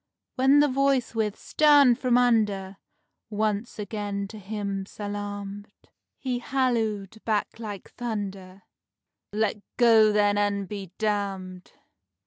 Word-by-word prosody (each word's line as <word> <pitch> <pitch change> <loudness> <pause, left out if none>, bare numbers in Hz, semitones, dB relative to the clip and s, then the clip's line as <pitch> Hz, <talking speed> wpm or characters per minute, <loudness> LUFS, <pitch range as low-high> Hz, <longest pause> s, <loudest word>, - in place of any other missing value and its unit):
When 270 +3 +5
the 295 - +4
Voice 270 -3 +1
with 220 -2 -1
"Stand 290 -5 +5
from 250 -2 +3
under!" 210 -6 +1 0.5
once 215 +1 -2
again 205 -1 -4
to 215 - -9
him 200 -1 -4
salamed, 205 0 -6 0.5
He 250 -2 -2
hallooed 225 -6 -1
back 215 0 -1
like 210 -4 -7
thunder: 195 -5 -5 0.7
"Let 215 0 0 0.2
go 225 -3 +6
then 205 -1 +3
and 200 -1 0
be 195 -3 -7
damned!" 195 -4 -3
210 Hz, 110 wpm, -26 LUFS, 200-235 Hz, 0.7 s, go